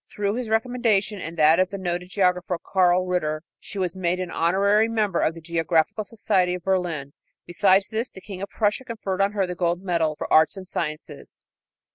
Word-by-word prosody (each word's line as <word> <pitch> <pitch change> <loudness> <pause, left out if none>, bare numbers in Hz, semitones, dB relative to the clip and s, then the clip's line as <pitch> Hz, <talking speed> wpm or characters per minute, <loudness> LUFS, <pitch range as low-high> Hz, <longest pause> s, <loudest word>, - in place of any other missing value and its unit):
Through 205 -1 -1
his 240 -1 -4
recommendation 220 -3 +1
and 165 +2 -6
that 155 +2 +5
of 185 0 +2
the 200 - -5
noted 180 -1 -3
geographer, 180 -2 +1
Karl 180 0 +2
Ritter, 155 -4 -1 0.2
she - - -9
was 185 -2 -1
made 180 -1 -1
an 180 -1 -4
honorary 200 +6 +3
member 215 -5 0
of 160 - +1
the 165 - -10
Geographical 165 +3 0
Society 185 -4 0
of 180 - -8
Berlin. 175 -7 -1 0.3
Besides 190 +2 +3
this, 225 +3 -2
the - - -12
King 190 0 -9
of 200 - -4
Prussia 210 +3 0
conferred 215 -6 -3
on 200 +1 +2
her 200 -2 +1
the 180 - -4
gold 175 +1 -1
medal 165 -4 0
for - - -5
arts 160 +4 +5
and 185 -1 -8
sciences. 155 -3 -6
185 Hz, 195 wpm, -24 LUFS, 170-200 Hz, 0.3 s, that